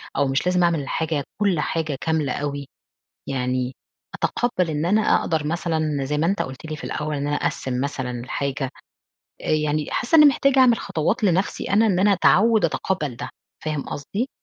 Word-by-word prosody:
أو 140 - +2
مش 135 +4 0
لازم 180 0 +2
أعمل 170 -3 +2
الحاجة 150 +1 -2 0.2
كل 195 -6 +2
حاجة 155 -4 -1
كاملة 160 -5 0
أوي. 140 -1 -3 0.6
يعني 125 -1 -1 0.4
أتَقبّل 185 -8 0
إن 155 +2 -1
أنا 210 +4 +3 0.2
أقدر 155 -2 -1
مثلًا 155 -3 -1
زي 150 +2 -1
ما 160 - +2
أنت 195 +3 +1
قُلت 130 +2 -8
لي 155 -1 -5
في - - -9
الأول، 150 0 -3
إن 140 0 -2
أنا 145 0 0
أقسّم 125 -1 -2
مثلًا 135 -3 -3
الحاجة. 130 +2 -3 0.7
أ - - -5
يعني 150 -1 +1
حاسّة 245 - +1
إنّي 300 -2 +9
محتاجة 275 -1 +4
أعمل 245 -3 +6
خطوات 165 +8 -1
لنفسي 190 0 +1
أنا، 210 +3 +4
إن 190 -4 +2
أنا 200 +1 +5
أتعوّد 215 +2 +4
أتَقبّل 155 -4 -2
ده 120 - -6 0.3
فاهم 155 -2 -2
قصدي؟ 200 - -3
155 Hz, 180 wpm, -23 LUFS, 140-185 Hz, 0.7 s, إنّي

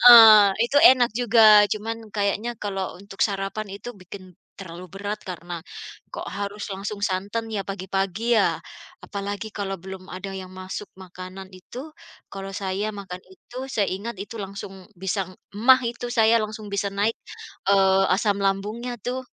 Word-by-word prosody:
Heeh. 220 -4 +10 0.2
Itu 280 - -1
enak 250 -3 +7
juga. 220 -3 +7
Cuma 220 +2 -2 0.2
kayaknya 210 +3 -1
kalau 195 -3 -4
untuk 200 0 -4
sarapan 195 +1 -2
itu 205 +5 -8
bikin 185 -1 -12 0.3
terlalu 175 -1 -9
berat 205 +2 -4
karena 175 -2 -6 0.5
kok - - -5
harus 200 +1 -5
langsung 200 +1 -5
santan 205 +4 -2
ya 205 -3 -3
pagi-pagi 195 +4 -1
ya. 205 - +2 0.4
Apalagi 205 +2 -5
kalau 195 -3 -3
belum 190 0 -8
ada 195 +1 -6
yang 185 -1 -8
masuk 185 +2 -6 0.2
makanan 185 +1 -9
itu, 185 +6 -11 0.5
kalau 195 0 -7
saya 195 +2 -2
makan 190 -3 -8
itu, 240 +6 -16 0.2
saya 205 -3 +1
ingat 200 +2 -5
itu, 215 +3 -7
langsung 195 -2 -7
bisa 190 0 -3 0.2
maag 255 +4 +6 0.2
itu, 240 0 -5
saya 225 -1 +5
langsung 215 -1 -7
bisa 200 0 -2
naik, 205 +3 0 0.5
eee, 195 -1 +5
asam 200 0 +1
lambungnya 210 +5 -1
tuh. 250 +1 -2
200 Hz, 150 wpm, -24 LUFS, 190-215 Hz, 0.5 s, Heeh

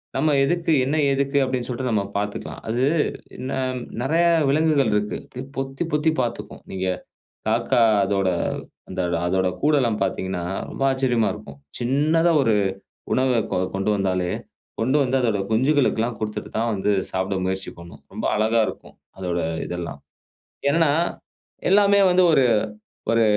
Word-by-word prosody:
நம்ம 150 +3 +2
எதுக்கு, 170 +3 +1
என்ன, 140 +4 0 0.2
எதுக்கு 140 +1 0
அப்படின்னு 130 -2 -2
சொல்லிட்டு 125 0 -2
நம்ம 105 -3 +1
பார்த்துக்கலாம். 105 0 -4
அது 120 +3 0 0.7
ந - - -3 0.5
நெறைய 160 +7 +2 0.2
விலங்குகள் 145 -4 +3
இருக்கு. 105 0 -1
அப்படி 125 - -8
பொத்தி 135 +3 -3
பொத்தி 150 +1 +3
பார்த்துக்கும். 120 -1 -4
நீங்க 95 0 -2 0.6
காக்கா 120 - +2 0.2
அதோட 95 -1 +1 0.6
அந்தொட 90 -2 -1
அதோட 95 +1 +1
கூடெல்லாம் 135 -8 +2
பார்த்தீங்கன்னா 95 -2 -2 0.3
ரொம்ப - - -4
ஆச்சரியமா 125 -4 +1
இருக்கும். 70 - -11 0.2
சின்னதா 150 +7 +2
ஒரு 115 -4 +3 0.6
உணவ 130 -2 +2
கொ - - +1 0.2
கொண்டு 95 +2 0
வந்தாலே, 95 -3 0 0.5
கொண்டு 130 +6 +2
வந்து 130 0 +1
அதோட 115 -5 +1
குஞ்சுகளுக்கெல்லாம் 120 -2 +2
குடுத்துட்டுத்தான் 110 +1 -3
வந்து 100 +1 0 0.2
சாப்பிட 95 +1 -1
முயற்சி 95 +1 -2
பண்ணும். 85 0 -12
ரொம்ப - - -5
அழகா 110 +2 +2
இருக்கும் - - -10 0.2
அதோட 90 -2 -2 0.3
இதெல்லாம். 90 -1 -5 0.7
என்னன்னா, 160 -1 +3 0.8
எல்லாமே 200 0 +5
வந்து 185 0 +5
ஒரு 135 -4 +5 0.7
ஒரு 115 0 +4
120 Hz, 135 wpm, -23 LUFS, 100-140 Hz, 0.8 s, எல்லாமே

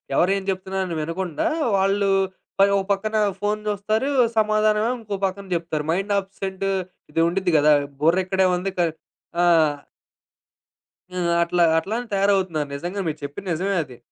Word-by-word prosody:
ఎవరేం 195 +4 +2
చెప్తున్నారని 190 -2 -3
వినకుండా, 165 +1 -2 0.3
వాళ్ళు 195 +1 +2 0.5
మరో 200 0 +5 0.2
పక్కన 215 +2 -3 0.2
ఫోను 210 +1 -1
చూస్తారు, 215 +6 0 0.3
సమాధానమేమో 215 +1 +2
ఇంకో 210 -3 -5
పక్కన 195 +1 -4
చెప్తారు. 165 -3 -2
మైండ్ 195 +4 0
అబ్సెంట్ 195 0 -5 0.5
ఇది - - -1
ఉండిద్ది 180 0 0
కదా! 150 +1 +5 0.3
బుర్రిక్కడే 185 +4 +3
ఉంది, 190 +2 -3
కా 175 - +3 0.6
ఆ! - - +4 1.7
ఆ! - - -9 0.3
అట్లా, 175 +1 +1
అట్లానే 225 +8 -2
తయారవుతున్నారు. 190 -6 +1
నిజంగా, 175 +7 -4
మీరు 155 -1 -3
చెప్పింది 145 +7 -6
నిజమే 195 +5 -1
అది. 125 -4 -13
190 Hz, 130 wpm, -23 LUFS, 175-200 Hz, 1.7 s, మరో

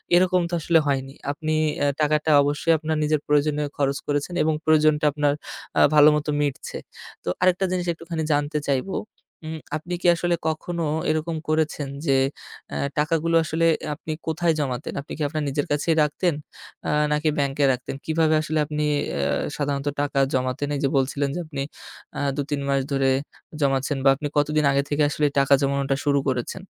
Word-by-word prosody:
এরকম 180 0 +4
তো - - -9
আসলে 165 +1 +4
হয়নি। 135 -1 -1 0.2
আপনি 155 +2 -3 0.3
অ্যা 145 - +2
টাকাটা 150 +1 +2
অবশ্যই 145 +3 +1
আপনার 155 +1 -2
নিজের 150 0 +2
প্রয়োজনে 150 0 +2 0.2
খরচ 140 -1 +1
করেছেন 145 +4 -1
এবং 160 - +2
প্রয়োজনটা 155 -1 +4
আপনার 145 0 +1 0.5
আ - - +6
ভালোমতো 150 0 +5
মিটছে। 145 -2 -2 0.5
তো - - -3
আরেকটা 185 +1 +3
জিনিস 180 -1 -1
একটুখানি 165 0 -5
জানতে 145 +1 0
চাইবো 140 +8 0 0.5
উম 160 0 -5 0.2
আপনি 175 +3 -7
কী - - +1
আসলে 175 +1 0
কখনো 170 +2 -2 0.3
এরকম 155 +1 -1
করেছেন 155 -2 0 0.2
যে 135 -2 +3 0.5
অ্যা - - -3 0.2
টাকাগুলো 165 +2 +1
আসলে 160 +1 0 0.3
আপনি 155 +1 -7 0.2
কোথায় 160 +1 +1
জমাতেন? 135 -2 -3
আপনি 145 - -15
কী - - -7
আপনার 155 +1 -3
নিজের 145 +1 -1
কাছেই 150 +3 +1
রাখতেন, 160 +4 0 0.5
আ - - 0 0.2
নাকি 150 +1 +2
ব্যাংকে 140 0 0
রাখতেন? 125 +1 -4
কিভাবে 160 0 +2
আসলে 155 0 -1
আপনি 150 0 -2 0.3
অ্যা 70 0 -1 0.3
সাধারণত 140 -1 -2
টাকা 145 -1 0
জমাতেন? 130 +2 -1
এই - - -2
যে 135 - +3
বলছিলেন 140 +1 0
যে - - -2
আপনি 145 -3 -5 0.6
আ - - -2 0.2
দু, 145 - -1
৩ 145 -1 -1
মাস 135 -1 +2
ধরে 135 -1 +2 0.5
জমাচ্ছেন 135 +1 +1
বা - - +8
আপনি 145 +2 -4
কতদিন 150 +1 +2
আগে 140 0 +2
থেকে 150 +1 +2
আসলে 150 0 0
টাকা 140 0 +4
জমানোটা 140 0 +1
শুরু 140 -1 +3
করেছেন? 130 +8 -2
150 Hz, 175 wpm, -24 LUFS, 140-160 Hz, 0.6 s, বা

